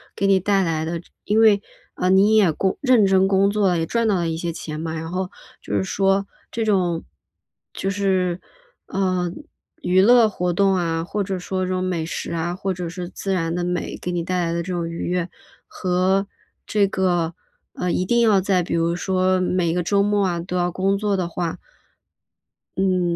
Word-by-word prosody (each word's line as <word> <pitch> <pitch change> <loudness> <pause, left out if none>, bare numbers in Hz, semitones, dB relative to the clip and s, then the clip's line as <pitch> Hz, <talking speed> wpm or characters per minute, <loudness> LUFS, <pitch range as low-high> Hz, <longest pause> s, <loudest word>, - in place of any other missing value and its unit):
给 200 - -1
你 195 -1 +4
带 195 +1 +2
来 160 -2 -1
的 170 +1 -3 0.3
因 210 +2 +2
为， 210 -2 +5 0.3
呃， 180 - 0
你 200 +3 +5
也 195 -6 +5
工 190 +5 -1
认 250 -6 +5
真 190 0 +4
工 195 +1 +3
作， 200 -4 +2
也 165 - 0
赚 230 +3 0
到 210 - +2
了 170 -2 0
一 160 - -2
些 170 0 -3
钱 155 -1 -6
嘛。 160 0 -4
然 160 +1 -5
后 185 0 -2 0.3
就 - - -4
是 - - +1
说 195 +1 +1 0.2
这 230 - -2
种， 180 -5 +1 0.7
就 195 - -2
是， 190 -3 0 0.5
呃， 185 -2 -1 0.5
娱 185 +1 +3
乐 230 +1 +6
活 180 -3 -1
动 195 +2 +3
啊， 165 -2 -1
或 205 +4 -3
者 190 -1 -2
说 185 +1 -3
这 - - -4
种 185 - -1
美 175 -3 -1
食 - - -5
啊， 170 +1 -2
或 190 0 -2
者 175 -1 -5
是 175 0 -6
自 195 +1 -3
然 165 -3 -1
的 175 0 -1
美， 180 0 -3
给 - - -4
你 170 -1 -1
带 180 0 -1
来 165 - -1
的 170 0 -1
这 185 - -5
种 170 -2 -2
愉 170 +1 -4
悦， 180 -1 0 0.4
和 185 +2 +1 0.4
这 205 -2 +2
个， 175 -3 0 0.4
呃， 180 -1 -2
一 185 - 0
定 235 +4 +2
要 215 -4 +5
在 185 -1 +1
比 - - -4
如 170 0 +1
说 185 0 +1
每 180 -2 +1
个 180 - 0
周 200 +4 +2
末 205 0 +2
啊 175 -2 -1
都 180 +2 -5
要 175 0 +1
工 195 +2 +1
作 205 -1 0
的 180 - -1
话 170 -1 -3 1.2
嗯， 185 -2 +1
185 Hz, 220 characters per minute, -22 LUFS, 175-195 Hz, 1.2 s, 乐